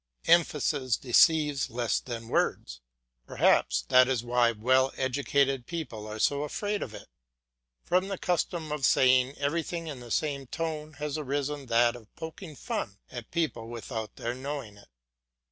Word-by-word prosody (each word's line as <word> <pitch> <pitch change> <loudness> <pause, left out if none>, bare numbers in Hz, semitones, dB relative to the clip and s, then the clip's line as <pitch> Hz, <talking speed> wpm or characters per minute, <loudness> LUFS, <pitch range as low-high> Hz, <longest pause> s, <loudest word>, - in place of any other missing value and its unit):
Emphasis 150 -6 +2
deceives 145 +2 +3
less 120 -1 0
than 115 -2 -7
words; 60 - -1 0.5
perhaps - - +3
that 125 - +5
is 130 -3 0
why 120 -1 +3
well 130 +4 +2
educated 135 -1 +1
people 130 -11 -5
are 110 0 -6
so 140 +6 +2
afraid 205 +8 -2
of 110 - -5
it. - - -11 0.8
From 185 +2 +1
the 195 -1 -3
custom 170 -3 -1
of 150 -2 -3
saying 130 +1 +4
everything 165 +3 -2
in 145 -5 -6
the 120 -1 -11
same 140 +1 -1
tone 155 0 -4
has 150 +2 -4
arisen 145 0 -3
that 120 +1 +3
of 110 -3 -15
poking 160 0 -8
fun 100 -5 -4
at 120 -3 -8
people 155 -9 -2
without 110 -2 -6
their 120 - -3
knowing 130 -4 -6
it. 100 - -17
135 Hz, 150 wpm, -28 LUFS, 120-155 Hz, 0.8 s, that